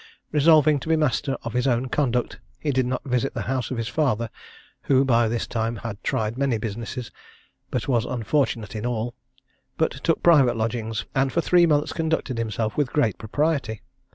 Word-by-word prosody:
Resolving 155 -1 +5
to 145 - -7
be 160 - +4
master 145 -2 0
of 115 - -5
his 125 +2 +1
own 125 0 +1
conduct, 125 -3 -1 0.2
he 150 - -1
did 130 -2 +1
not 130 0 -2
visit 125 0 -1
the - - -2
house 130 -3 -2
of 130 - -3
his 115 -1 -2
father, 115 -3 0 0.6
who 135 0 +5
by 120 -3 +3
this 115 +1 -1
time 115 0 -2
had 110 -1 -7
tried 110 +3 -1
many 135 -4 +1
businesses, 115 +3 -5 0.6
but 125 +2 -2
was 120 -5 +2
unfortunate 115 -3 -1
in 105 - -4
all; 120 -1 -2 0.6
but 160 - +2
took 165 - +1
private 140 -9 +5
lodgings, 110 -1 -2
and 135 -1 +1
for 170 - +1
three 175 0 +4
months 150 -2 +1
conducted 160 -6 -1
himself 110 -1 -2
with 145 -4 +1
great 115 -10 +1
propriety. 125 -2 -1
125 Hz, 180 wpm, -24 LUFS, 115-145 Hz, 0.6 s, Resolving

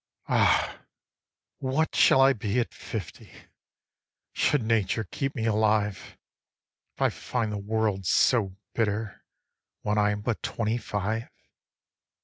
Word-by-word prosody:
5. - - -1
Ah, - - +2 0.7
what 135 +4 0
shall 135 - +6
I 135 +1 +6
be 105 0 -1
at 120 - -2
fifty 105 -7 -7 1.0
Should 145 -5 +2
Nature 110 -1 +1
keep 135 +4 -4
me 115 -3 -2
alive, 105 -4 0 0.8
If - - -13
I - - +4
find 115 -4 -3
the 105 - -3
world 105 -2 -1
so 100 -7 +3 0.2
bitter 110 -2 -2 0.6
When 105 0 +1
I 105 0 +3
am 105 0 -2
but 115 +1 -2
twenty 115 0 -1
five? 110 +2 -3
110 Hz, 125 wpm, -27 LUFS, 105-115 Hz, 1.0 s, shall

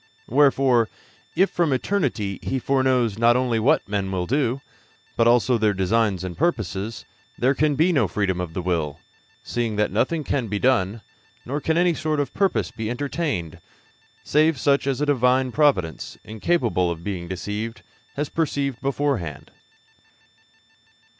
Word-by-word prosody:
Wherefore, 130 -3 +3 0.5
if 190 +3 +3
from 170 -4 +1
eternity 130 - -1
He 135 - -2
foreknows 130 -4 +1
not 120 +1 +5
only 125 -3 +1
what 115 +6 +2
men 100 -1 -2
will 90 -2 -1
do, 135 +2 0 0.5
but 115 - +3
also 120 0 +3
their 105 -2 +2
designs 95 0 +1
and 90 -2 -5
purposes, 110 - -2 0.3
there 130 +3 +2
can 150 +1 +1
be 165 +5 +3
no 140 - +3
freedom 95 -4 -1
of 85 -2 -6
the 90 - -3
will, 80 -5 -1 0.4
seeing 115 -3 -2
that 105 0 +1
nothing 140 - 0
can 135 -4 -1
be 105 0 -2
done, 110 -3 +1 0.4
nor 140 +5 -3
can 160 +2 0
any 175 0 +3
sort 155 -1 -1
of 145 - -2
purpose 195 -1 0
be 110 -1 -4
entertained, 135 - -3 0.6
save 155 0 +3
such 140 0 +2
as 135 0 -1
a - - +2
Divine 130 -2 +2
providence, 115 - +1
incapable 110 - 0
of 85 -1 -5
being 90 -3 -4
deceived, 105 +5 -5 0.3
has 145 +1 -2
perceived 140 -5 -2
beforehand. 125 - -2
120 Hz, 150 wpm, -23 LUFS, 100-140 Hz, 0.6 s, not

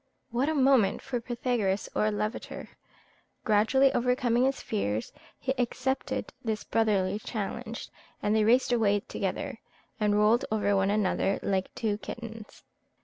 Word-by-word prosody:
What 250 +5 +1
a 315 - 0
moment 260 -8 +4
for 245 -2 -3
Pythagoras 235 -5 -1
or 215 - +2
Lavater! 210 +1 -4 0.7
Gradually 240 +6 +4
overcoming 250 0 +2
his 270 0 0
fears, 110 - -2 0.2
he 265 - -1
accepted 255 +2 -1
this 220 -2 -2
brotherly 205 -3 +1
challenge, 225 +2 -5 0.3
and 210 +1 +1
they 215 - +4
raced 245 +3 +4
away 205 -3 +3
together, - - -4 0.4
and 210 -1 +2
rolled 215 +3 +4
over 205 -2 +1
one 195 0 +2
another 200 -1 +1
like 190 -1 0
two 210 -2 -1
kittens. 225 -2 -9
220 Hz, 135 wpm, -28 LUFS, 205-245 Hz, 0.7 s, moment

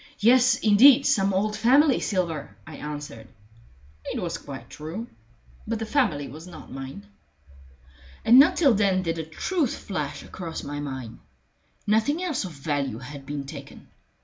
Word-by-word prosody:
"Yes, 245 +3 +5
indeed 250 +6 +6
some 200 -8 +2
old 210 +3 0
family 260 +6 +4
silver," 170 -7 -3
I 155 -2 -10
answered. 145 -6 -7 0.8
It - - -3
was - - -3
quite - - -9
true. 160 +10 -7 0.6
But 230 +1 -1
the 225 - -4
family 215 - 0
was 155 +6 -10
not 180 - -12
mine. 135 -6 -8 1.2
And 240 +3 +8
not 330 +6 +6
till 285 -8 +4
then 195 -3 +2
did 165 -1 -2
the 160 - -3
truth 280 - -2
flash 150 -8 -5
across 170 -3 -7
my 145 0 -5
mind. 130 -5 -6 0.7
Nothing 225 - +1
else 305 - -2
of 180 - -6
value 140 -4 -3
had 135 +2 -10
been 145 -1 -4
taken. 135 - -11
185 Hz, 150 wpm, -25 LUFS, 145-235 Hz, 1.2 s, And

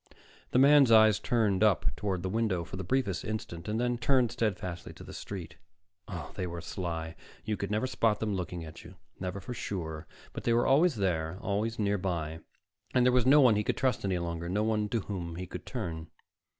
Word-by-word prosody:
The - - +1
man's 140 -1 +7
eyes 110 -2 +7
turned 110 -4 +1
up 105 -4 +2
toward 95 -4 -2
the - - -1
window 105 -4 0
for 90 - -8
the 95 - -4
briefest 100 -3 0
instant, 105 -6 -5
then 115 +3 0
returned 120 0 +2
steadfastly 90 -6 -3
to - - -12
the - - -10
street. 90 -3 -7 0.5
Oh, 90 -4 -6
they 90 -2 -3
were 85 0 -5
sly! 85 -1 -4 0.3
You 110 -1 0
could 100 - -4
never 105 +4 0
spot 115 -4 +1
them 110 -2 -1
looking 90 -3 -4
at 80 0 -11
you, 85 +2 -12 0.2
never 95 +1 -4
for 110 +6 -6
sure, 80 -8 -5 0.3
but - - -6
they 120 - +2
were 120 +1 +3
always 150 +3 +4
there, 90 -4 -1
always 105 +3 -1
nearby. 90 -6 -1 0.6
And 125 -1 +5
there 125 - +4
was 125 -1 +3
no 145 +2 +7
one 125 -5 +6
he 105 - +1
could - - -1
trust 130 -2 +1
any 95 -2 0
longer, 85 0 -3
no 105 +4 +1
one 105 -1 0
to 115 0 0
whom 90 -4 -5
he 90 +2 -5
could - - -9
turn. 85 -10 -4
100 Hz, 205 wpm, -30 LUFS, 85-115 Hz, 0.6 s, man's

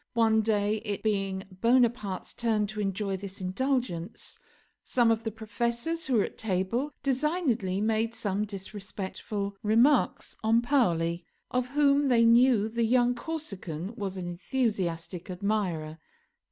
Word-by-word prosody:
One 220 -1 +4
day, 210 -1 +1
it 210 -2 -4
being 195 -3 0
Bonaparte's 230 -2 +1
turn 220 -3 +1
to 210 +1 -6
enjoy 195 0 -1
this 195 +1 -8
indulgence, 195 -2 -2 0.4
some 240 -2 +3
of 225 0 0
the 225 - -1
professors 235 +9 -2
who 260 - +1
were 210 - +4
at - - -7
table 220 +7 -1
designedly 260 - 0
made 225 +1 0
some 205 0 -1
disrespectful 200 0 -5
remarks 235 +6 +3
on 225 +2 +3
Paoli, 170 - +1 0.3
of 250 0 0
whom 285 +1 +3
they 235 -3 +5
knew 230 -2 +5
the 230 +1 -1
young 245 +1 +3
Corsican 205 - -5
was 195 -2 -4
an 180 -1 -4
enthusiastic 180 -3 -2
admirer. 180 -5 -2
215 Hz, 130 wpm, -28 LUFS, 195-240 Hz, 0.4 s, they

